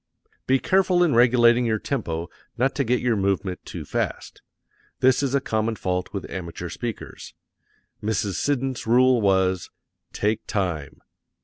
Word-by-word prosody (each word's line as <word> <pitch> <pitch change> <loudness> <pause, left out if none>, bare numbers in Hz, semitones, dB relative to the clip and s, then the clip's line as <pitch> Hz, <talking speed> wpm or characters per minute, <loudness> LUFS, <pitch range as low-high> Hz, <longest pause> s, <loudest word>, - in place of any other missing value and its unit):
Be 130 - +4
careful 185 +3 +3
in 165 -5 +2
regulating 120 0 +5
your 110 -1 +1
tempo 85 - -3 0.3
not 130 +2 +1
to 140 - 0
get 125 0 +1
your 120 -2 +1
movement 95 -2 -1
too - - -7
fast. - - -4 0.6
This 130 0 +4
is 140 -1 0
a - - +4
common 110 -3 -1
fault 90 -2 -2
with 100 - -5
amateur 90 -1 -6
speakers. 115 +2 -7 0.7
Mrs. 105 -2 -1
Siddons 135 0 -1
rule 125 +1 +4
was, 95 -2 +1 0.4
"Take 105 +1 -1
time." 85 -8 -3
115 Hz, 140 wpm, -24 LUFS, 95-130 Hz, 0.7 s, regulating